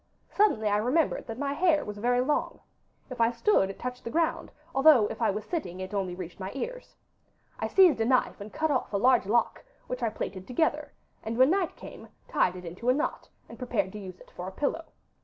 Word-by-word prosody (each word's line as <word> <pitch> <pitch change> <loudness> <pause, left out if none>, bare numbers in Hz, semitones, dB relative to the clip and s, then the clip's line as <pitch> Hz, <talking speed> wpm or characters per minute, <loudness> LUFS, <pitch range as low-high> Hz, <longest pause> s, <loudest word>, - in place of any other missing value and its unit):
'Suddenly 390 - +2
I 205 0 +2
remembered 255 +9 +1
that 225 -1 -6
my 280 0 -2
hair 310 -1 +2
was 210 0 -7
very 245 +3 +2
long. 295 +4 -1 0.5
If 245 -2 -3
I 230 - +5
stood 235 - +2
it 195 - -7
touched 250 0 -6
the - - -5
ground, 325 +4 0 0.2
although 270 -5 +6
if - - -7
I 225 - +3
was 210 +1 -3
sitting 285 - -4
it 185 +2 -6
only 190 -3 -2
reached 180 -1 -8
my 190 0 -5
ears. - - -6 0.6
I - - -1
seized 355 -11 +5
a - - +2
knife 255 -3 +1
and 205 +1 -8
cut 315 -1 0
off 260 - -1
a - - +2
large 245 -2 +3
lock, 235 +3 +1 0.2
which 250 0 -5
I 230 - +1
plaited 190 -3 -6
together, 300 +2 0 0.3
and 225 +1 -4
when 260 +4 +5
night 375 -3 0
came - - -11 0.2
tied 180 - +1
it 180 0 -9
into 185 +9 -3
a 255 - +4
knot, 300 - -3 0.2
and - - -12
prepared 245 -6 -1
to 210 - -8
use 185 -2 -9
it - - -17
for 180 - -6
a - - -5
pillow. 295 +9 -2
245 Hz, 225 wpm, -28 LUFS, 205-295 Hz, 0.6 s, although